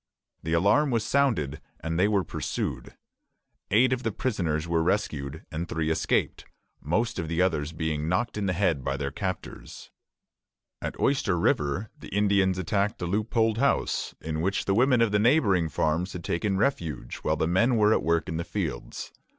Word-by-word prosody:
The 80 0 -3
alarm 100 - +3
was 115 -3 0
sounded, 110 - +1 0.2
and 80 +2 -2
they 95 - +4
were 100 -3 +2
pursued. - - -4 0.7
Eight 125 +5 +4
of 125 - -2
the 115 - -1
prisoners 85 -10 -1
were 85 -1 +1
rescued, 80 -6 -2
and 80 +2 -4
three 80 -1 -1
escaped; 80 - 0 0.4
most 110 +9 -1
of 85 - -3
the 85 +1 -2
others 80 -4 0
being 80 -1 -2
knocked 90 +6 0
in 105 -2 -1
the 95 - +1
head 85 -7 +1
by - - -1
their 70 -1 -3
captors. 95 +3 -6 0.9
At - - -5
Oyster 125 -10 +1
River 80 +5 0
the - - -10
Indians 100 -2 +2
attacked 100 +4 0
a - - 0
loopholed 110 +4 +1
house, 140 +1 0
in 80 0 -3
which 95 +3 0
the 95 - +1
women 125 +3 +4
of 115 -3 +3
the 105 - +3
neighboring 105 - +3
farms 80 +5 0
had 90 -2 -6
taken 95 +4 -1
refuge 80 - -1
while - - -1
the - - +1
men 115 +9 +3
were 105 0 +5
at - - +2
work 85 +2 +1
in 80 -3 -3
the 85 - -2
fields. - - -4
95 Hz, 180 wpm, -27 LUFS, 80-110 Hz, 0.9 s, were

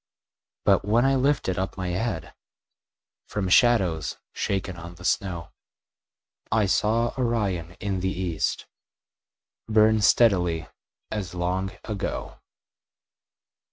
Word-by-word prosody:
But - - +4
when 115 +5 +3
I 135 - +4
lifted 130 -9 +1
up 95 0 -3
my 95 -1 -2
head 90 -2 -3 0.9
From 100 -3 -2
shadows 95 - +3 0.2
shaken 95 -2 -2
on 85 0 -9
the 90 +1 -11
snow, 90 -4 -1 1.0
I 110 -1 +3
saw 110 +4 +1
Orion 100 -9 -1
in 95 -2 -2
the 95 +1 0
east 90 -4 -2 1.0
Burn 110 0 +4
steadily 90 -8 +3 0.4
as 95 -5 -4
long 90 +2 -1
ago. 105 -4 -4
95 Hz, 105 wpm, -25 LUFS, 90-110 Hz, 1.0 s, But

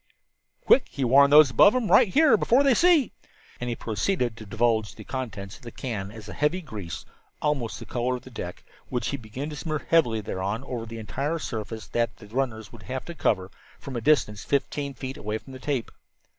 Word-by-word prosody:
"Quick!" 265 - +5
he 140 - -3
warned 140 +3 +6
those 150 -3 +8
about 200 - +6
him. 245 -4 0
"Right - - +7
here 295 +9 +5
before 255 +4 +3
they 275 -2 +5
see." 335 - +4 0.5
And 125 - -3
he 120 - -1
proceeded 120 - -1
to 110 -2 -11
divulge 110 0 +1
the - - -10
contents 100 -7 -6
of - - -24
the 120 - -8
can 110 -5 -5
as 105 -1 -11
a 100 - -7
heavy 150 - +1
grease, 105 - -7 0.3
almost 140 -7 -1
the - - -9
color 125 +1 -1
of 125 - -8
the 130 - -12
deck, 90 -6 -7 0.3
which 125 -2 -1
he - - -2
began 130 +6 -6
to - - -6
smear 155 0 -4
heavily 125 -10 +4
thereon 100 +3 -3
over 120 -4 -5
the 115 +1 -7
entire 135 - -2
surface 110 -6 -5
that 115 -1 -1
the 110 - -13
runners 110 -2 -3
would 115 - -12
have 130 +2 -5
to 170 - -7
cover, 95 - 0 0.3
from 135 - -8
a 120 - -2
distance 110 -7 +2
fifteen 140 0 -1
feet 130 +2 -6
away 105 +1 -3
from 135 +4 -13
the 130 - -9
tape. 130 -3 -2
125 Hz, 210 wpm, -26 LUFS, 110-145 Hz, 0.5 s, those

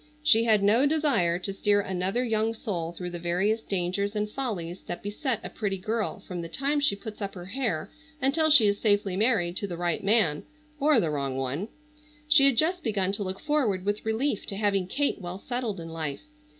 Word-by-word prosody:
She 230 -6 +5
had 215 -3 +3
no 230 +8 +4
desire 285 - +2
to 195 +2 -4
steer 205 +1 +2
another 190 +4 -1
young 225 -1 0
soul 175 -7 -3
through 180 0 -6
the 175 - -5
various 185 +6 +1
dangers 200 +1 -2
and 210 0 0
follies 200 -8 -4
that - - -5
beset 225 +4 -2
a - - -5
pretty 200 -3 -2
girl 215 +3 -2
from 180 -2 -6
the 165 - -7
time 280 - 0
she 285 -8 +2
puts 215 +1 -9
up 200 0 -4
her 175 -1 -8
hair 195 -6 -2 0.3
until 300 +4 +2
she 285 -8 +8
is 200 0 +2
safely 205 -3 +1
married 200 -5 +2
to 200 - -2
the 175 -3 -5
right 175 0 -1
man—or 285 - +1
the 165 -7 0
wrong 140 -3 -2
one. 135 +9 -2 0.6
She 300 -2 +6
had 270 -4 +2
just 350 +6 +2
begun 195 -4 0
to 205 +1 -2
look 190 0 -4
forward 245 -12 0
with 205 +1 -1
relief 220 +2 -1
to 195 - -3
having 200 -3 +1
Kate 280 +2 0
well 175 +1 -5
settled 235 -2 -3
in 165 0 -7
life. 155 -4 -4
205 Hz, 200 wpm, -27 LUFS, 180-245 Hz, 0.6 s, she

